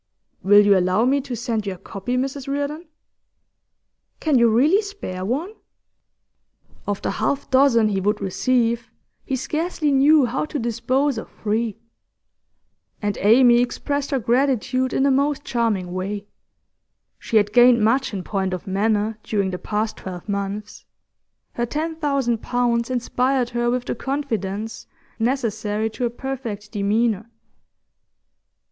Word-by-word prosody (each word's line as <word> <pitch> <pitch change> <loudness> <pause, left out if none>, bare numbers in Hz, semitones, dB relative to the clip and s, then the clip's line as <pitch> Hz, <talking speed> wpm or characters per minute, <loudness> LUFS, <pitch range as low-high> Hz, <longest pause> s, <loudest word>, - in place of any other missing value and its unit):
'Will 205 +1 +6
you 200 -1 +6
allow 185 +4 +2
me 275 +2 +2
to 260 -2 -5
send 225 -3 -2
you 195 - -2
a - - -14
copy, 195 +6 -4
Mrs 270 +1 -3
Reardon?' 285 +4 -3 1.3
'Can 295 -5 +2
you 235 0 +5
really 290 - +4
spare 400 - -6
one?' 285 - -2 1.3
Of 205 -1 -2
the - - 0
half 280 -1 -2
dozen 260 -4 +5
he 195 -2 -1
would 210 +2 0
receive, 235 +4 0 0.3
he 270 - -2
scarcely 305 +3 -1
knew 280 +1 +5
how 245 +5 -2
to 305 - -5
dispose 240 +2 0
of - - -9
three. 220 0 -2 1.2
And 205 -2 -1
Amy 240 +3 +6
expressed 285 +3 -2
her 275 - +1
gratitude 255 +1 +1
in - - +1
the 280 - +4
most 285 +2 +1
charming 210 -7 -1
way. 200 +2 -4 0.9
She 225 - 0
had 205 0 +2
gained 240 -1 +6
much 255 +5 +2
in 195 -3 -4
point 190 -2 -2
of 180 - -9
manner 210 +2 0
during 200 -4 -1
the 180 - -4
past 215 +1 -2
twelve 180 0 -8
months; 200 +1 -4 0.7
her 240 - -1
ten 320 +5 -3
thousand 275 -7 0
pounds 240 -1 0
inspired 250 0 0
her 240 0 0
with 245 0 -1
the - - -2
confidence 225 -7 -4 0.3
necessary 220 -3 -1
to 245 - -2
a - - +1
perfect 235 -5 -6
demeanour. 215 +1 0
235 Hz, 140 wpm, -22 LUFS, 210-270 Hz, 1.3 s, Will